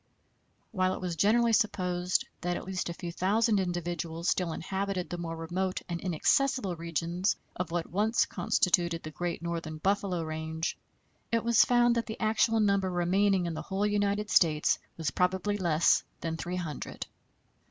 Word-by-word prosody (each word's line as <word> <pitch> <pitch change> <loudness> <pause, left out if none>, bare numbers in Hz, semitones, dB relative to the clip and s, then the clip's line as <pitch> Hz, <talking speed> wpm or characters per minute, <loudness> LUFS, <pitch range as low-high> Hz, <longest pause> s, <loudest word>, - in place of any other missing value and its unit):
While 185 -2 +1
it - - -7
was 180 -2 -3
generally 225 +6 +3
supposed 180 -5 +1 0.2
that 175 0 -1
at - - -6
least 185 -2 -3
a - - -3
few 170 0 -6
thousand 210 +5 +2
individuals 175 -2 -2
still 180 -3 0
inhabited 190 +2 -3
the 175 - -3
more 165 -1 -4
remote 180 +3 -2
and 170 -1 -4
inaccessible 195 - +1
regions 170 +3 -1 0.2
of 180 -2 -3
what 170 0 -1
once 215 +5 +1
constituted 170 -2 +1
the 155 - -6
great 175 +1 -4
northern 165 -2 -4
buffalo 190 0 0
range, 160 +1 -3 0.6
it 230 -1 +1
was 235 -1 +5
found 240 -1 +4
that 235 -1 -1
the 220 - -6
actual 225 +1 +2
number 200 -2 +2
remaining 185 +2 +2
in 170 - -2
the - - -4
whole 195 +2 -1
United 205 0 0
States 155 -3 +3 0.2
was 160 -5 -1
probably 185 +5 +1
less 170 -3 +3 0.2
than 165 -1 -2
three 180 +2 -4
hundred. 165 -6 -5
180 Hz, 165 wpm, -29 LUFS, 170-205 Hz, 0.6 s, was